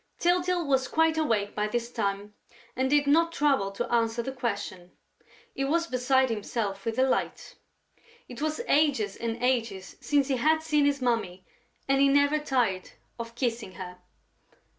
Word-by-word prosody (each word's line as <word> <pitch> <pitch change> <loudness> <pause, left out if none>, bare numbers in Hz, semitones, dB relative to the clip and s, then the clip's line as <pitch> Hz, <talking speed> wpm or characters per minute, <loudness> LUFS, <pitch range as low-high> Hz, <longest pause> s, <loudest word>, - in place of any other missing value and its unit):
Tyltyl 355 0 +1
was 265 -2 +1
quite 320 0 +2
awake 225 -10 0
by 210 0 -1
this 235 +2 -3
time 205 -2 -3 0.4
and 260 +1 0
did 290 0 +3
not 330 +4 +3
trouble 275 -11 +1
to - - -3
answer 230 0 +1
the 265 - -4
question. 200 -8 -5 0.6
He 275 - -2
was 335 +5 +1
beside 260 -2 +1
himself 205 -2 -3
with 225 -1 -1
delight! 260 +1 -1 0.7
It 250 +2 -9
was 310 +6 -1
ages 280 -9 +2
and 230 0 -3
ages 230 -7 -1
since 285 -2 +1
he 270 -2 0
had 315 +5 +2
seen 300 -2 +2
his 280 -2 0
Mummy 215 -7 -1 0.4
and 275 0 +3
he 280 - +6
never 285 +2 +3
tired 245 -10 0 0.3
of 230 0 -7
kissing 235 -6 -2
her. 180 -1 -9
255 Hz, 160 wpm, -27 LUFS, 220-285 Hz, 0.7 s, he